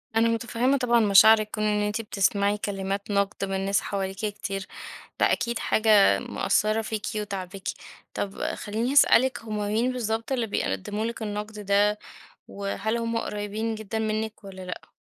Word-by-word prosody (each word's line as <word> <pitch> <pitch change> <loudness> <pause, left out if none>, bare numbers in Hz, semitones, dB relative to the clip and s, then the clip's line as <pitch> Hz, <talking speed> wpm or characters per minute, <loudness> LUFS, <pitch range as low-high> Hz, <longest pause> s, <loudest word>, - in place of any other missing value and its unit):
أنا 225 +1 +4
مُتفهّمة 235 +4 +1
طبعًا 240 -2 +3
مشاعرِك. 215 +1 +6
كون 215 - -2
إن 210 0 +1
أنتِ 210 +2 -1
بتسمعي 200 -1 +1
كلمات 195 0 -3
نقد 200 0 0
من 195 0 -2
ناس 195 0 +2
حواليكِ 195 -1 -3
كتير، 195 -2 -4 0.5
ده - - +4
أكيد 235 -1 -1
حاجة 215 -2 +4
مأثّرة 215 +1 0
فيكِ 220 -1 -4
وتاعباكِ. 195 -2 -5 0.5
طب 195 -1 -4
خلّيني 225 +5 -2
أسألِك، 260 -3 +5
هُم 215 -1 -4
مين 215 +5 0
بالضبط 225 0 -2
اللي 240 -4 0
بيقدّموا 205 - -2
لِك 230 0 -5
النقد 210 0 -5
ده؟ 205 +1 +3 0.5
وهل 200 +3 -3
هُم 230 0 -2
قريبين 210 +1 -3
جدًا 220 0 -4
منِك 220 0 -3
والّا 190 -1 -9
لأ؟ 180 -1 -8
210 Hz, 150 wpm, -26 LUFS, 200-225 Hz, 0.5 s, مشاعرِك